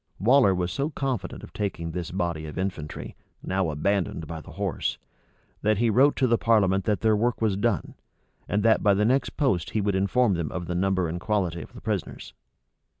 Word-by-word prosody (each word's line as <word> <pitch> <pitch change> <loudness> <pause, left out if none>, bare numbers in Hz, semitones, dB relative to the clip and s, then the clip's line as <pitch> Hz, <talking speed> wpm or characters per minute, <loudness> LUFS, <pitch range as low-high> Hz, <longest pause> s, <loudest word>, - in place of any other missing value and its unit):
Waller 115 -2 +4
was 90 0 -1
so 140 +2 -1
confident 130 - -3
of - - -11
taking 85 -5 -3
this 85 -1 -4
body 85 -4 -2
of 75 - -8
infantry, 90 -6 -4 0.3
now 95 -2 0
abandoned 85 +2 -1
by 80 +1 -6
the - - -12
horse, - - -2 0.6
that 110 0 +2
he 115 +1 +2
wrote 135 +6 +4
to 135 - +2
the 115 -2 +2
parliament 100 -4 +3
that 105 -2 0
their 110 -1 +4
work 120 +3 0
was 110 -4 +1
done, 100 -3 -1 0.6
and 105 +1 +1
that 115 -1 +4
by 100 -2 +4
the 105 +2 +2
next 130 +4 +1
post 95 - +1
he 110 - -1
would 100 0 0
inform 100 +4 +2
them 85 -4 -2
of 90 -1 -4
the 90 - -3
number 95 0 +1
and 85 +2 -4
quality 90 -6 -1
of - - -12
the - - -11
prisoners. - - -4
100 Hz, 205 wpm, -26 LUFS, 90-110 Hz, 0.6 s, Waller